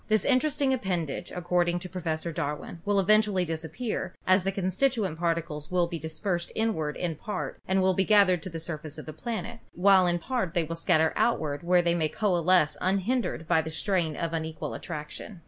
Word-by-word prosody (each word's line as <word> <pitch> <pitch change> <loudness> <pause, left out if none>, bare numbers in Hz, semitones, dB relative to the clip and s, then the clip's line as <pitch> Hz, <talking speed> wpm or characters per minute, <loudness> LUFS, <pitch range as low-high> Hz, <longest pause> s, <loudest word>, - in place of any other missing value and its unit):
This 215 0 +2
interesting 280 0 +2
appendage, 180 - -2
ac 180 - -5
cording 175 0 +1
to 175 - -6
Professor 170 -2 -3
Darwin, 155 +2 -4
will 205 -1 +2
eventually 205 -1 +3
disappear, 165 +6 -4
as 185 +1 +5
the 195 +2 -1
constituent 195 - 0
particles 165 -3 -1
will 180 -1 +2
be 170 -1 -5
dispersed 170 +3 -3
inward 180 -10 -1
in 175 -2 -1
part 205 +5 -5
and 190 0 +2
will 190 0 +4
be 190 - +2
gathered 195 -4 +4
to 185 - -6
the 165 -1 -6
surface 155 -2 -5
of - - -8
the 155 - -7
planet, 230 +6 -5 0.2
while 190 0 +5
in 175 0 +2
part 190 -3 -2
they 170 - +3
will 165 +1 -4
scatter 165 -1 +2
outward 155 -11 0
where 175 0 +3
they 170 0 +2
may 160 -3 +1
coalesce 180 -6 +2
unhindered 195 -2 0
by 165 -2 +4
the 160 - -6
strain 165 -1 -1
of 165 +2 -3
unequal 160 -1 -4
attraction. 155 +6 -7
175 Hz, 190 wpm, -28 LUFS, 160-200 Hz, 0.2 s, as